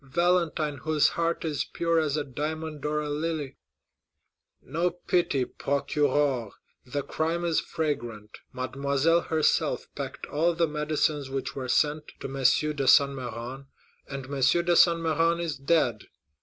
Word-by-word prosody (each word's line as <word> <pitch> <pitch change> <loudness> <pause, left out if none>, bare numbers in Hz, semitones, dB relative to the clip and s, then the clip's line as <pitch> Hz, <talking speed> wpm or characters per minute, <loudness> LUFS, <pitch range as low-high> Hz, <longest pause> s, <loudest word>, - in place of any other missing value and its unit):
Valentine, 160 0 +1
whose 155 +2 +2
heart 170 0 -1
is 150 -3 -1
pure 170 -1 0
as 155 -2 0
a 150 - 0
diamond 155 +2 -5
or 150 0 0
a 150 - -4
lily!" 150 -2 -3 1.0
"No 170 +6 -1
pity, 175 -6 0
procureur; 140 -4 0 0.3
the 140 +3 -3
crime 165 +2 -1
is 165 -2 +2
fragrant. 120 -10 -4
Mademoiselle 140 +5 +1
herself 160 -2 +1
packed - - -5
all 165 +3 +1
the 170 0 +3
medicines 150 -2 -1
which 135 0 -4
were 130 -2 -4
sent 150 +3 +1
to - - -8
M. 135 - -8 0.4
de 140 -2 -2
Saint 140 +1 +6
Méran; 125 +1 -6 0.4
and 140 -1 -6
M. 135 - -11 0.3
de 175 0 +3
Saint 170 -1 +6
Méran 165 +1 +1
is 170 -3 -2
dead. 135 -7 +1
150 Hz, 145 wpm, -27 LUFS, 135-165 Hz, 1.0 s, Saint